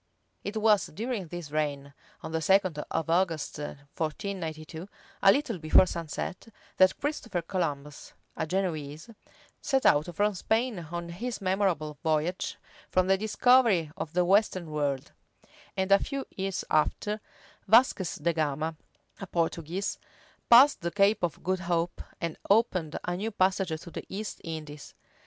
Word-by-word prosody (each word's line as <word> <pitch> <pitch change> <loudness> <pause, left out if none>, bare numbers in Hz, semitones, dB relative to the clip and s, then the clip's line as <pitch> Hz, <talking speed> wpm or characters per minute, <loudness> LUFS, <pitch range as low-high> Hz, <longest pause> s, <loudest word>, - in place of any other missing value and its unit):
It 210 +2 -4
was 215 -2 +4
during 220 0 -4
this 170 -3 -7
reign, 145 -2 -2 0.3
on 160 - -6
the 160 0 -1
second 185 -2 +3
of 165 0 -1
August, 165 -3 0
1492, 160 +3 -5 0.3
a 195 - +8
little 245 - -1
before 155 +3 +6
sunset, 170 +3 -5 0.3
that 185 0 +5
Christopher 230 - -2
Columbus, 150 -5 -4 0.2
a - - -2
Genoese, 160 -1 -3 0.5
set 270 -2 +1
out 145 +3 +5
from 205 +2 +2
Spain 220 -2 -1
on 170 0 -4
his 230 +8 -4
memorable 185 -6 0
voyage 160 +3 0 0.3
for 185 - +3
the 190 +1 +3
discovery 215 -4 +3
of 150 - -5
the 180 0 +2
western 185 -3 +2
world; 145 -3 -2 0.7
and 190 +1 0
a 195 - +8
few 275 +3 -4
years 195 -1 -3
after, 210 +7 +1 0.5
Vasquez 220 -5 +4
de 170 +3 0
Gama, 155 0 -1 0.4
a 195 - -6
Portuguese, 170 +3 -2 0.5
passed 260 +5 +8
the 170 - -1
Cape 200 +3 +3
of 175 -3 -2
Good 185 0 0
Hope, 175 -1 -1 0.2
and 170 -2 -4
opened 190 -7 +2
a 175 - -2
new 205 +5 -2
passage 185 -5 +1
to 170 - -11
the - - -7
East 210 +2 -5
Indies. 155 -3 -7
180 Hz, 140 wpm, -28 LUFS, 155-200 Hz, 0.7 s, a